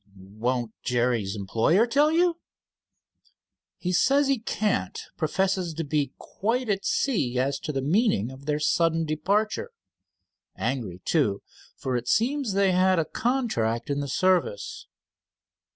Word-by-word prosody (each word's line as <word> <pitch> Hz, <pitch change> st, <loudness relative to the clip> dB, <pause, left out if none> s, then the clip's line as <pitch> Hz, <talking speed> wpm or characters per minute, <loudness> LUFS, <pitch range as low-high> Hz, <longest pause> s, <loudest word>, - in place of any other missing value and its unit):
"Won't 110 Hz, +5 st, -3 dB
Jerry's 120 Hz, -5 st, 0 dB
employer 115 Hz, -, +2 dB
tell 285 Hz, +5 st, +3 dB
you?" 340 Hz, +1 st, +2 dB, 1.4 s
"He 180 Hz, 0 st, -2 dB
says 275 Hz, +9 st, +3 dB
he 270 Hz, -3 st, +2 dB
can't. 205 Hz, -, -1 dB, 0.2 s
Professes 185 Hz, +1 st, 0 dB
to 165 Hz, -, -2 dB
be 145 Hz, -1 st, -1 dB
quite 230 Hz, +4 st, -2 dB
at 195 Hz, -1 st, 0 dB
sea 140 Hz, -, 0 dB
as 135 Hz, +2 st, 0 dB
to -, -, -4 dB
the 135 Hz, -2 st, -2 dB
meaning 150 Hz, -, +2 dB
of 135 Hz, +2 st, -13 dB
their 150 Hz, 0 st, 0 dB
sudden 165 Hz, +1 st, +2 dB
departure. 205 Hz, -, 0 dB, 0.9 s
Angry, 100 Hz, -9 st, -3 dB
too, 110 Hz, -12 st, +1 dB, 0.3 s
for 130 Hz, -1 st, -2 dB
it 120 Hz, 0 st, -3 dB
seems 255 Hz, -, +1 dB
they 195 Hz, -1 st, +3 dB
had 185 Hz, 0 st, +3 dB
a 165 Hz, -, +2 dB
contract 150 Hz, -, -1 dB
in 140 Hz, -, 0 dB
the 140 Hz, -, -3 dB
service." 185 Hz, -, 0 dB
165 Hz, 135 wpm, -26 LUFS, -, 1.4 s, tell